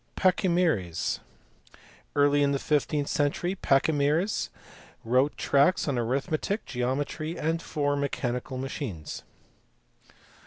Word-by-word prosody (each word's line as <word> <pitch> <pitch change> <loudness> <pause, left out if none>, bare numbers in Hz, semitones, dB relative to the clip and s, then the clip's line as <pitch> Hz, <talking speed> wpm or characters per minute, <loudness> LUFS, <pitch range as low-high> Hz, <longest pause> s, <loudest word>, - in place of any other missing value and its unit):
Pachymeres. 170 - +1 1.0
Early 145 0 +4
in 140 0 +3
the - - +2
fifteenth 145 0 0
century 145 +5 0
Pachymeres 150 +3 +1 0.6
wrote 130 +5 +2
tracts 145 +6 +3
on 135 -4 0
arithmetic, 150 - -1
geometry, 145 +6 -2
and 165 +2 -1
four 145 -3 -1
mechanical 130 -2 -2
machines. 130 - -5
145 Hz, 90 wpm, -27 LUFS, 130-160 Hz, 1.0 s, Early